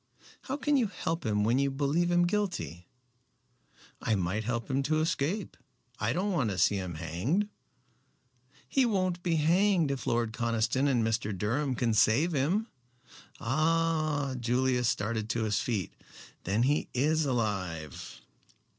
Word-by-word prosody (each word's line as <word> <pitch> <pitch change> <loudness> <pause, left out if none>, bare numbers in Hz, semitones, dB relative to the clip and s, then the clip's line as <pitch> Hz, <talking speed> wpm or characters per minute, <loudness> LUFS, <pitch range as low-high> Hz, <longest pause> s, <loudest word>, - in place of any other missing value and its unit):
"How 270 +1 -2
can 295 0 +2
you 240 -4 +2
help 165 - -3
him 105 -1 +1
when 120 +5 +2
you 140 0 +2
believe 145 +5 0
him 175 0 +3
guilty?" 175 - -2 1.1
"I 110 - +1
might 95 +3 -1
help 120 -1 -2
him 135 +1 0
to 155 +3 +1
escape. 165 +5 -1 0.4
I 110 +1 0
don't 190 +9 0
want 140 - +1
to 95 - -3
see 100 - +3
him 90 -3 -4
hanged." 90 - -1 1.2
"He 270 - +2
won't 185 -6 0
be 170 -2 0
hanged 170 0 +3
if 135 -2 -4
Lord 115 -1 0
Conniston 115 +3 +1
and 125 -5 +2
Mr. 110 -3 -1
Durham 130 +8 0
can 115 -1 +1
save 120 - +3
him." 165 +9 +1 0.7
"Ah!" 155 +1 +1
Julius 125 0 +1
started 110 -2 -2
to 115 0 0
his 105 -3 +1
feet. 105 -8 -2 0.5
"Then 105 +6 +1
he 145 +4 +1
is 155 +5 +2
alive." 95 - -3
130 Hz, 145 wpm, -30 LUFS, 110-165 Hz, 1.2 s, him